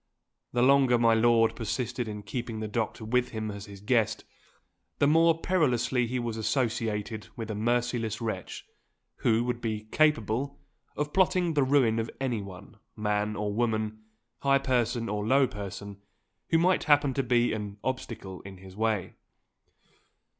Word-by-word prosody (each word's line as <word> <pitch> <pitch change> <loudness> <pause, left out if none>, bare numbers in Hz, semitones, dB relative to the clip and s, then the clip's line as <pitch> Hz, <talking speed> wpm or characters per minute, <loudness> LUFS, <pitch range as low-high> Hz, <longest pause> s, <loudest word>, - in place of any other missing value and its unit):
The 120 0 +2
longer 135 -2 +5
my 115 -1 +4
lord 115 0 +4
persisted 120 +1 -3
in 105 -1 -6
keeping 120 -2 -4
the 110 - -3
doctor 110 +1 -3
with 125 +2 +1
him 110 -1 -4
as 100 0 -8
his 100 -1 -11
guest, 115 0 +1 0.7
the - - +3
more 165 +2 +4
perilously 125 -9 +1
he 125 +2 -2
was 120 -2 -3
associated 110 -3 -1
with 110 -2 -5
a - - -2
merciless 115 0 0
wretch, 110 -6 -5 0.5
who 115 0 +2
would 120 -1 -2
be 110 -2 -2
capable 140 -3 +1 0.4
of 150 0 -2
plotting 185 -2 +2
the 145 - +2
ruin 130 -4 +3
of 115 - -2
anyone 105 -5 -5 0.2
man 105 0 -1
or 105 -1 -2
woman, 110 -1 -1 0.4
high 140 0 +4
person 120 -3 0
or 105 -1 -2
low 135 +5 +4
person 100 -1 -7 0.5
who 165 - +4
might 180 +3 +2
happen 145 -2 +4
to 135 - +1
be 120 -1 +2
an 105 -2 -5
obstacle 115 -7 -4
in 95 -1 -10
his 95 0 -13
way. 110 -3 -1
115 Hz, 155 wpm, -28 LUFS, 105-130 Hz, 0.7 s, longer